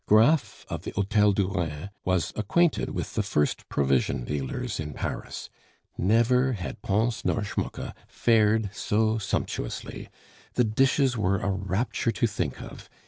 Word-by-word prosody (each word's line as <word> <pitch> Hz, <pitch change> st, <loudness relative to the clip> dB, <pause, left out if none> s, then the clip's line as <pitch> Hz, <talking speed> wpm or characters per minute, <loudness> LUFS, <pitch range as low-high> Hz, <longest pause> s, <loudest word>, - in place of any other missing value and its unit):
Graff 120 Hz, +8 st, +4 dB
of -, -, -4 dB
the -, -, -5 dB
Hotel 105 Hz, +1 st, +3 dB
du 100 Hz, -1 st, +1 dB
Rhin 90 Hz, -1 st, -3 dB
was 90 Hz, -2 st, 0 dB
acquainted 160 Hz, -, +2 dB
with -, -, -4 dB
the -, -, +1 dB
first 75 Hz, 0 st, 0 dB
provision 70 Hz, -2 st, +1 dB
dealers 75 Hz, -, -3 dB
in 75 Hz, -2 st, -5 dB
Paris; -, -, -5 dB, 0.4 s
never 120 Hz, +6 st, +3 dB
had 90 Hz, -6 st, -5 dB
Pons 115 Hz, +3 st, 0 dB
nor 110 Hz, -, +1 dB
Schmucke 100 Hz, -, -4 dB
fared 110 Hz, -2 st, +3 dB
so 110 Hz, +2 st, +1 dB
sumptuously. 95 Hz, -, -3 dB, 0.5 s
The 125 Hz, -, +4 dB
dishes 130 Hz, +2 st, +2 dB
were 100 Hz, -1 st, +2 dB
a 100 Hz, +1 st, -1 dB
rapture 100 Hz, +5 st, -1 dB
to -, -, +1 dB
think 95 Hz, -, -2 dB
of! -, -, -11 dB
105 Hz, 140 wpm, -27 LUFS, 95-115 Hz, 0.5 s, Graff